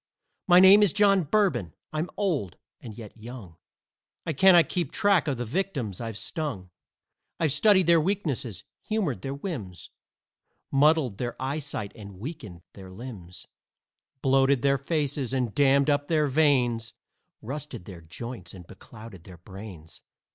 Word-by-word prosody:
My 180 Hz, -1 st, +7 dB
name 190 Hz, +3 st, +8 dB
is 205 Hz, -6 st, +4 dB
John 200 Hz, -4 st, +3 dB
Bourbon, 140 Hz, -, +1 dB, 0.2 s
I'm 155 Hz, +3 st, -2 dB
old, 160 Hz, -, -1 dB, 0.2 s
and 110 Hz, -4 st, -10 dB
yet 110 Hz, -3 st, -10 dB
young; 110 Hz, -7 st, -11 dB, 0.7 s
I 165 Hz, -, -2 dB
cannot 175 Hz, +2 st, +6 dB
keep 180 Hz, -2 st, -2 dB
track 200 Hz, -6 st, +2 dB
of 140 Hz, -4 st, -1 dB
the 120 Hz, -, -3 dB
victims 130 Hz, -, -3 dB
I've 115 Hz, -3 st, -5 dB
stung. 115 Hz, -, -5 dB, 0.7 s
I've 160 Hz, -3 st, +1 dB
studied 190 Hz, +5 st, +4 dB
their 170 Hz, -1 st, +5 dB
weaknesses, 150 Hz, -, -2 dB, 0.2 s
humored 185 Hz, -, -2 dB
their 135 Hz, +3 st, -4 dB
whims, 125 Hz, -, -7 dB, 0.8 s
Muddled 140 Hz, -6 st, +3 dB
their 120 Hz, -1 st, -4 dB
eyesight 135 Hz, -6 st, -4 dB
and 100 Hz, -3 st, -11 dB
weakened 105 Hz, -, -8 dB
their 95 Hz, -2 st, -12 dB
limbs, 95 Hz, -4 st, -10 dB, 0.8 s
Bloated 135 Hz, -1 st, +3 dB
their 140 Hz, -1 st, +2 dB
faces 140 Hz, -3 st, -2 dB
and 125 Hz, -5 st, -1 dB
dammed 140 Hz, -1 st, +3 dB
up 145 Hz, 0 st, 0 dB
their 155 Hz, -2 st, +2 dB
veins, 130 Hz, -6 st, +1 dB, 0.5 s
Rusted 140 Hz, -5 st, -7 dB
their 90 Hz, -3 st, -10 dB
joints 90 Hz, +3 st, -9 dB
and 90 Hz, -2 st, -12 dB
beclouded 105 Hz, -3 st, -13 dB
their 90 Hz, -2 st, -12 dB
brains. 95 Hz, -3 st, -11 dB
135 Hz, 140 wpm, -26 LUFS, 105-160 Hz, 0.8 s, name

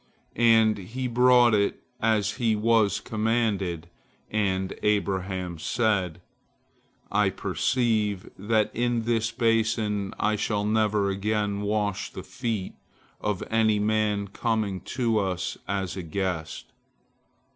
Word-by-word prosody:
And 115 Hz, -2 st, +4 dB
he 125 Hz, +7 st, -4 dB
brought 125 Hz, -1 st, +5 dB
it 100 Hz, -1 st, +1 dB, 0.2 s
as 110 Hz, -2 st, +1 dB
he 115 Hz, -4 st, +2 dB
was 110 Hz, -1 st, +2 dB
commanded, 105 Hz, -7 st, -1 dB, 0.4 s
and 95 Hz, -3 st, 0 dB
Abraham 95 Hz, -4 st, -1 dB
said, 95 Hz, -4 st, 0 dB, 0.9 s
"I -, -, +3 dB
perceive 110 Hz, -6 st, 0 dB
that 105 Hz, +2 st, +1 dB
in 120 Hz, -1 st, 0 dB
this 115 Hz, -1 st, +1 dB
basin 115 Hz, -3 st, 0 dB
I 105 Hz, 0 st, +1 dB
shall 105 Hz, 0 st, -1 dB
never 105 Hz, -2 st, +2 dB
again 105 Hz, 0 st, -1 dB
wash 105 Hz, -1 st, -1 dB
the -, -, -8 dB
feet 115 Hz, -6 st, -4 dB, 0.5 s
of 105 Hz, -3 st, -2 dB
any 110 Hz, -1 st, +3 dB
man 105 Hz, -1 st, +1 dB
coming 105 Hz, -3 st, -1 dB, 0.2 s
to 115 Hz, -4 st, +2 dB
us 95 Hz, -2 st, -2 dB
as 95 Hz, -2 st, -2 dB
a 95 Hz, -, -4 dB
guest." 85 Hz, -2 st, -4 dB
105 Hz, 115 wpm, -26 LUFS, 100-115 Hz, 0.9 s, brought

